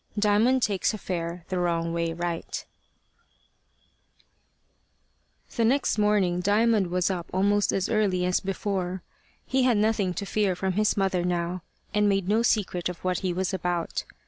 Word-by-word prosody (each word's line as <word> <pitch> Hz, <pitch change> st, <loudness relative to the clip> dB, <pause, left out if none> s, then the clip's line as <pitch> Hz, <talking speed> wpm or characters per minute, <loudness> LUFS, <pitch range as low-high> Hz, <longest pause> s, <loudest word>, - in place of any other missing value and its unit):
DIAMOND 215 Hz, +5 st, +3 dB
TAKES 205 Hz, +1 st, +1 dB
A -, -, -5 dB
FARE 170 Hz, -3 st, -4 dB
THE 185 Hz, -1 st, -1 dB
WRONG 170 Hz, -1 st, 0 dB
WAY 170 Hz, -1 st, -1 dB
RIGHT 170 Hz, 0 st, -4 dB, 2.9 s
THE 230 Hz, -, +1 dB
next 250 Hz, -1 st, +2 dB
morning 205 Hz, -4 st, +2 dB
Diamond 205 Hz, +1 st, +2 dB
was 180 Hz, +2 st, 0 dB
up 175 Hz, -2 st, -4 dB
almost 205 Hz, +2 st, +2 dB
as 190 Hz, -, 0 dB
early 195 Hz, -5 st, +1 dB
as 180 Hz, 0 st, +2 dB
before. 190 Hz, -2 st, -3 dB, 0.4 s
He 265 Hz, 0 st, +1 dB
had 250 Hz, -3 st, +3 dB
nothing 205 Hz, -4 st, +1 dB
to 200 Hz, -, -3 dB
fear 200 Hz, -2 st, 0 dB
from 190 Hz, +1 st, -1 dB
his 210 Hz, +2 st, +1 dB
mother 190 Hz, -2 st, +1 dB
now, 175 Hz, 0 st, -1 dB, 0.3 s
and 210 Hz, 0 st, +3 dB
made 195 Hz, -2 st, 0 dB
no 215 Hz, +3 st, +3 dB
secret 200 Hz, -7 st, 0 dB
of 180 Hz, -, -6 dB
what 185 Hz, -1 st, 0 dB
he 185 Hz, -2 st, -1 dB
was 185 Hz, +2 st, -2 dB
about. 175 Hz, -2 st, -2 dB
190 Hz, 155 wpm, -26 LUFS, 180-210 Hz, 2.9 s, DIAMOND